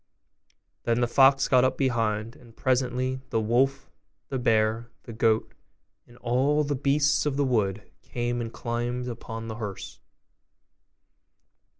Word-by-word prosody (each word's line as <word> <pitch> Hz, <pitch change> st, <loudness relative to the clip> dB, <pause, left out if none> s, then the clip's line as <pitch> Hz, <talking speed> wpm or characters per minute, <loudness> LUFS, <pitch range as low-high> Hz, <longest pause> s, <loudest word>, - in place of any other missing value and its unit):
Then 115 Hz, 0 st, 0 dB
the 120 Hz, -, +2 dB
fox 135 Hz, +2 st, +5 dB
got 125 Hz, -1 st, +4 dB
up 130 Hz, 0 st, +1 dB
behind; 115 Hz, -3 st, 0 dB
and 115 Hz, -2 st, -18 dB
presently 130 Hz, 0 st, 0 dB
the 115 Hz, -, 0 dB
wolf, 130 Hz, +5 st, +1 dB, 0.4 s
the 135 Hz, -, -2 dB
bear, 110 Hz, 0 st, +1 dB
the 115 Hz, -, -9 dB
goat, 110 Hz, 0 st, +1 dB, 0.5 s
and 120 Hz, -, -18 dB
all 135 Hz, +6 st, +1 dB
the 145 Hz, 0 st, -1 dB
beasts 140 Hz, +2 st, +2 dB
of 140 Hz, -2 st, -1 dB
the 145 Hz, -, +2 dB
wood, 105 Hz, -5 st, 0 dB, 0.2 s
came 120 Hz, 0 st, -3 dB
and 115 Hz, -1 st, -5 dB
climbed 120 Hz, +1 st, -3 dB
upon 115 Hz, -1 st, -6 dB
the 110 Hz, 0 st, -6 dB
hearse. 105 Hz, -4 st, -7 dB
120 Hz, 135 wpm, -26 LUFS, 115-130 Hz, 0.5 s, fox